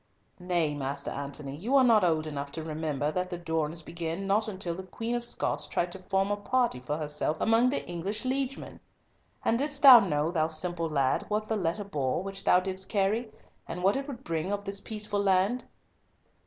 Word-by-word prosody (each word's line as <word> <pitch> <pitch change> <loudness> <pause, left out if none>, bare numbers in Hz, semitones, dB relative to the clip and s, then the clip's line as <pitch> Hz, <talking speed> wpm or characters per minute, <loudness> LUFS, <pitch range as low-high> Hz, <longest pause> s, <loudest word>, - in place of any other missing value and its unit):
"Nay, 175 -4 0
Master 140 0 -4
Antony, 140 0 -5
you 225 - -1
are 270 - +7
not 225 -5 +5
old 160 -3 +2
enough 140 -2 -5
to 160 - -4
remember 155 -2 -2
that 180 +2 -2
the 175 - -4
durance 160 -1 -2
began 170 +3 -4
not 210 +3 +2
until 185 -4 -4
the 180 - -6
Queen 225 +5 -5
of 240 0 -1
Scots 240 - -2
tried 175 0 -1
to 190 - -8
form 195 +1 0
a 205 - 0
party 240 - 0
for 145 +4 -3
herself 150 0 -1
among 230 +3 +4
the 275 - -2
English 190 +7 -3
liegemen. 265 +1 -3 0.7
And 230 - +2
didst 285 0 0
thou 260 -4 +12
know, 160 -6 0
thou 160 -3 +1
simple 165 +1 0
lad, 140 -4 +1
what 215 +1 -1
the 220 - 0
letter 190 +1 -1
bore, 150 -4 -2
which 195 0 -6
thou 180 - +5
didst 190 0 -4
carry, 215 +3 0 0.4
and 180 +2 -5
what 195 +2 +4
it 275 +1 -3
would 265 -3 -7
bring 165 +3 -2
on 205 0 -2
this 195 0 0
peaceful 210 -1 -3
land?" 195 +5 +2
185 Hz, 200 wpm, -29 LUFS, 160-215 Hz, 0.7 s, thou